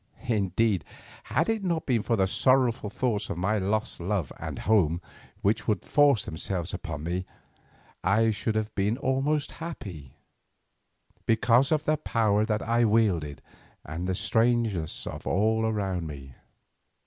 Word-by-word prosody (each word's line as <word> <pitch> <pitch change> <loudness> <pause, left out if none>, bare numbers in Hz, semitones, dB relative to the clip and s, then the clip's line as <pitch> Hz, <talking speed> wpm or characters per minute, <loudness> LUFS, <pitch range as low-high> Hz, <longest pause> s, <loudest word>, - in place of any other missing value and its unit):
Indeed, 100 -3 +1 0.4
had 160 - +1
it 225 -2 0
not 170 -4 -1
been 120 -5 +2
for 115 - 0
the 95 -3 +3
sorrowful 125 +1 +2
thoughts 110 -1 -1
of - - -3
my 100 +4 +1
lost 105 +3 -1
love 90 -3 -2
and - - -5
home 90 -6 +2 0.4
which 105 +3 +1
would 105 -4 0
force 145 - +4
themselves 85 +2 -3
upon 80 -5 -5
me, 90 +3 -3 0.8
I 110 +4 +3
should 110 +1 -2
have 110 0 -1
been 105 +4 0
almost 140 +3 0
happy, 95 - -7 1.1
because 120 +4 +4
of 155 -1 +1
the 155 0 +2
power 110 -7 +1
that 105 -1 -1
I 120 +1 +3
wielded 100 -10 +1 0.4
and 80 +5 -4
the 95 - 0
strangeness 110 -4 0
of - - -7
all 110 +3 +2
around 95 -6 -1
me. 70 -3 -9
110 Hz, 145 wpm, -27 LUFS, 95-120 Hz, 1.1 s, force